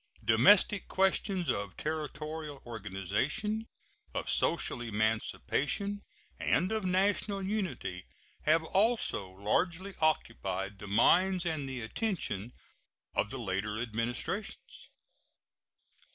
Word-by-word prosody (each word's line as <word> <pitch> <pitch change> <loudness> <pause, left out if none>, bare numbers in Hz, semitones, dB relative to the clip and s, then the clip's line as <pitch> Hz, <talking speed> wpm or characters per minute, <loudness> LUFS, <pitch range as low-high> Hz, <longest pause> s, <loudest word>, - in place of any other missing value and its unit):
Domestic 135 - +5
questions 190 -1 +1
of 100 -2 -2
territorial 155 -1 -4
organization, 115 - -2 0.5
of - - -1
social 160 -6 +2
emancipation, 120 - -1 0.4
and 185 +3 +2
of 220 -1 0
national 195 +2 +1
unity 185 - -3 0.4
have 160 +2 +4
also 195 - +2
largely 170 - 0
occupied 100 -10 0
the 105 - -8
minds 180 - +4
and 155 -5 -2
the 130 -2 -4
attention 120 - -2 0.6
of - - +1
the 135 - -5
later 105 -1 -2
Administrations. 120 - -3
150 Hz, 95 wpm, -31 LUFS, -, 0.6 s, Domestic